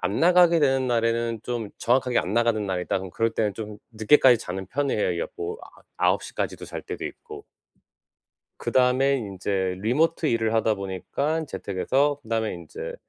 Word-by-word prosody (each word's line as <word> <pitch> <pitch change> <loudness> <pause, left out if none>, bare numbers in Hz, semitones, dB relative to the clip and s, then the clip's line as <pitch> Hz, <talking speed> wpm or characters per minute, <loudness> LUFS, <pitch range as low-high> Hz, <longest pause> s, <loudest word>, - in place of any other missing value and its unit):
안 95 +4 -1
나가게 175 -1 +5
되는 135 -2 +2
날에는 115 -1 0
좀 120 -4 -4
정확하게 125 0 +2
"안 90 - -4
나가는 115 -2 +2
날이다." 95 -1 -1
그러면 95 -1 -7
그럴 115 +5 0
때는 105 -2 0
좀 105 -2 -7
늦게까지 120 +2 +5
자는 95 -2 -5
편이에요. 105 -7 0
여 - - -1
뭐 425 +1 -4
아 - - -16
아홉 - - +2
시까지도 - - -4
잘 - - -7
때도 - - -6
있고. 435 -2 -8 1.1
그다음에 130 +2 +2
인제 95 -3 -2
리모트 155 - +1
일을 115 -3 +1
하다 110 -1 +2
보니깐 140 - -3
재택에서 135 +8 0
그다음에 110 -3 -1
인제 85 -3 -7
115 Hz, 360 characters per minute, -25 LUFS, 100-140 Hz, 1.1 s, 나가게